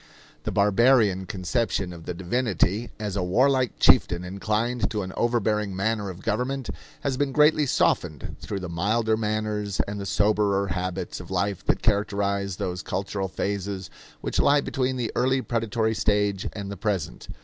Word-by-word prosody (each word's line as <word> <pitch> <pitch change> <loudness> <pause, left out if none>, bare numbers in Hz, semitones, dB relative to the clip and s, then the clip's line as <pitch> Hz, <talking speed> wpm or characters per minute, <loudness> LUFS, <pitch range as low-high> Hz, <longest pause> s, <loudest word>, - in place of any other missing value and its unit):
The - - -1
barbarian 105 -2 +4
conception 95 -1 -1
of 85 -1 -11
the 90 - -3
divinity, 100 +2 0
as 105 -2 -3
a 100 - 0
warlike 130 +7 +2
chieftain 85 0 +5
inclined 110 +5 -1
to 105 -3 -2
an 95 0 -6
overbearing 105 -4 0
manner 105 +1 -1
of 95 +1 -9
government, 125 +4 -1 0.3
has 135 -2 -1
been 145 0 0
greatly 150 +1 +4
softened 75 - 0
through 100 -2 -5
the 90 - -4
milder 110 +6 +1
manners 105 -2 -2
and 100 0 -5
the 100 - -4
soberer 100 -1 +2
habits 90 0 -3
of 90 - -10
life 95 +1 -1
that - - +1
characterize 100 -2 0
those 90 0 -3
cultural 95 +1 -3
phases 95 +1 -3 0.3
which - - -2
lie 145 0 +5
between 130 -1 -1
the 120 -3 -2
early 130 +2 +2
predatory 115 -1 0
stage 105 -2 +1
and 100 -1 -5
the 100 - -6
present. 95 -5 -2
105 Hz, 160 wpm, -25 LUFS, 95-115 Hz, 0.3 s, chieftain